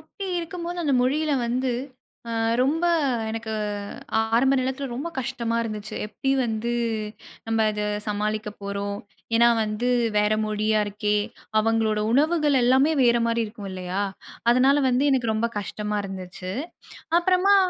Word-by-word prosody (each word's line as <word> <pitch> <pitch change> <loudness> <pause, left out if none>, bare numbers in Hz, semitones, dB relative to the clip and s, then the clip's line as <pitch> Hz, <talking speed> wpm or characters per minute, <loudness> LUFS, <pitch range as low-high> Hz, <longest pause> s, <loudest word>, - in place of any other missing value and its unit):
அப்படி 395 - -9
இருக்கும்போது 345 +1 -5
அந்த 285 -3 +1
மொழியில 300 +4 +1
வந்து 250 +1 0 0.6
அ - - -4 0.3
ரொம்ப 310 +6 +2 0.5
எனக்கு 225 0 -4 0.8
ஆரம்ப 265 +3 +4
நேரத்தில 265 +2 -2
ரொம்ப 290 +7 -3
கஷ்டமா 240 -3 -2
இருந்துச்சு. 215 -1 -5
எப்டி 270 +5 -3
வந்து 230 +1 -2 0.7
நம்ம 225 -1 +2
அத 210 0 -3 0.2
சமாளிக்கப் 210 0 -2
போறோம்? 200 0 -3 0.4
ஏன்னா 235 +1 +6
வந்து 215 +3 -1 0.3
வேற 210 +1 +3
மொழியா 215 0 +1
இருக்கே, 210 +1 0 0.4
அவங்களோட 220 -1 +1
உணவுகள் 295 -1 +3
எல்லாமே 265 +5 +4
வேற 240 -1 +5
மாரி 230 0 +1
இருக்கும் 210 -2 -8
இல்லையா? 185 +2 -3 0.5
அதனால 260 +4 +5
வந்து 255 +3 +2
எனக்கு 235 -4 +1
ரொம்ப 230 +2 +1
கஷ்டமா 210 +1 -3
இருந்துச்சு. 185 -1 -6 0.7
அப்றமா 370 +3 +4
230 Hz, 130 wpm, -24 LUFS, 210-270 Hz, 0.8 s, ஏன்னா